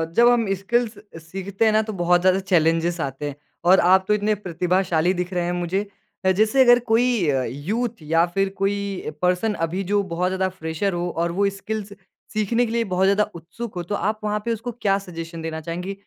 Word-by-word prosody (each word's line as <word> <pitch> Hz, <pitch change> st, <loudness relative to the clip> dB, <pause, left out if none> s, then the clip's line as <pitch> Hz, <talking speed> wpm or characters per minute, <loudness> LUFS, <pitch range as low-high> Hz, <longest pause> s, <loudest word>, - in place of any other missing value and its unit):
जब 235 Hz, +1 st, +6 dB
हम 230 Hz, -5 st, +2 dB
स्किल्स 220 Hz, +3 st, -1 dB, 0.3 s
सीखते 195 Hz, +5 st, -2 dB
हैं 220 Hz, -, +5 dB
ना, 215 Hz, -, +4 dB
तो 215 Hz, 0 st, -5 dB
बहुत 175 Hz, 0 st, +4 dB
ज़्यादा 185 Hz, +1 st, +3 dB
चैलेंजेज़ 170 Hz, -2 st, +1 dB
आते 135 Hz, +1 st, -4 dB
हैं, 140 Hz, -, -8 dB, 0.3 s
और 185 Hz, +2 st, +6 dB
आप 190 Hz, +2 st, +5 dB
तो 210 Hz, -, +3 dB
इतने 210 Hz, 0 st, +1 dB
प्रतिभाशाली 180 Hz, -2 st, 0 dB
दिख 180 Hz, +1 st, -2 dB
रहे 175 Hz, -1 st, 0 dB
हैं 175 Hz, -, -1 dB
मुझे। 185 Hz, +3 st, 0 dB, 0.4 s
अ, 190 Hz, -, +5 dB
जैसे 215 Hz, +7 st, +3 dB
अगर 245 Hz, -1 st, +6 dB
कोई 230 Hz, -7 st, +3 dB
अ, 135 Hz, -2 st, +1 dB
यूथ 220 Hz, -, -3 dB
या 165 Hz, +2 st, +2 dB
फिर 195 Hz, 0 st, +2 dB
कोई 200 Hz, -3 st, -2 dB
पर्सन, 180 Hz, +4 st, +1 dB
अभी 175 Hz, +1 st, -2 dB
जो 205 Hz, -, +4 dB
बहुत 180 Hz, +2 st, 0 dB
ज़्यादा 190 Hz, 0 st, 0 dB
फ्रेशर 160 Hz, +5 st, -1 dB
हो 175 Hz, 0 st, -2 dB
और 170 Hz, +1 st, 0 dB
वो 200 Hz, 0 st, +4 dB
स्किल्स 205 Hz, 0 st, -5 dB, 0.4 s
सीखने 220 Hz, +3 st, +1 dB
के 225 Hz, -, -5 dB
लिए 235 Hz, 0 st, +1 dB
बहुत 185 Hz, +1 st, +3 dB
ज़्यादा 200 Hz, +2 st, +4 dB
उत्सुक 185 Hz, +7 st, -8 dB
हो, 175 Hz, -, -3 dB
तो 205 Hz, +4 st, -3 dB
आप 215 Hz, +2 st, -1 dB
वहाँ 210 Hz, 0 st, 0 dB
पे 235 Hz, -, +1 dB
उसको 230 Hz, +2 st, -5 dB
क्या 205 Hz, -5 st, +1 dB
सजेशन 165 Hz, -3 st, -8 dB
देना 160 Hz, 0 st, -4 dB
चाहेंगे 175 Hz, +4 st, -4 dB
190 Hz, 210 wpm, -23 LUFS, 175-215 Hz, 0.4 s, जब